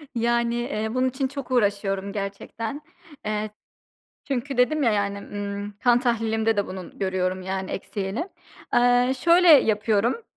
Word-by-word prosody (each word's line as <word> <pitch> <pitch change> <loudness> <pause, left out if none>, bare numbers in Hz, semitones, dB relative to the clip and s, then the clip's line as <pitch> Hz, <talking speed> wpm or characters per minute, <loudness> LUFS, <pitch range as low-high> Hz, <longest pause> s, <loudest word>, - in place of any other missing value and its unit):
Yani, 235 0 +1
eee, 220 -2 -2
bunun 255 0 +2
için 265 +1 -2
çok 275 -1 -7
uğraşıyorum 200 -4 0
gerçekten. 215 +6 -5 0.4
Eee, 215 0 -2 0.8
çünkü 270 0 -2
dedim 295 +5 +2
ya, 230 -4 +3
yani, 200 -1 -1
ımm, 205 0 -5
kan 245 0 +5
tahlilimde 225 -2 +1
de 200 - +1
bunun 185 -1 -9
görüyorum, 185 -1 -1
yani, 190 0 -3
eksiğini. 200 - -4 0.5
Eee, 245 +1 +4
şöyle 345 +3 +5
yapıyorum, 225 - +4
220 Hz, 135 wpm, -24 LUFS, 200-250 Hz, 0.8 s, kan